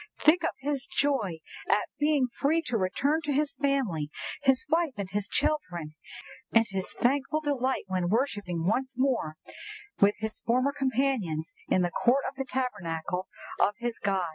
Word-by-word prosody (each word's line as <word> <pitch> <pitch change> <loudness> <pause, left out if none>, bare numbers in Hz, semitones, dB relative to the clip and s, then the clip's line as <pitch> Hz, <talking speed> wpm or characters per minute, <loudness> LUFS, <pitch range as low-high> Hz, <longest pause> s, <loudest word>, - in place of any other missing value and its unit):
"Think 325 +4 +5
of - - 0
his 275 -1 -2
joy 210 - 0 0.3
at - - +3
being 295 -2 +3
free 320 +4 +2
to 245 - -3
return 265 - +1
to 300 -2 -2
his 285 +1 +1
family—his 265 - 0
wife 325 -1 +2
and 200 -2 -3
his 205 0 -1
children; 175 - -1 0.6
and 225 0 +5
his 190 -1 -3
thankful 275 +4 +1
delight 265 -4 0
when 185 -2 -1
worshipping 205 -8 0
once 260 +6 0
more 250 - +1 0.6
with 200 +1 +5
his 220 0 -4
former 255 +4 +2
companions 255 - 0
in 185 - +3
the 175 - 0
court 255 +8 +3
of 265 - -4
the 270 -1 -4
Tabernacle 180 -9 -2 0.3
of 205 - +3
his 240 -1 -3
God!" 190 -4 0
250 Hz, 155 wpm, -29 LUFS, 190-280 Hz, 0.6 s, Think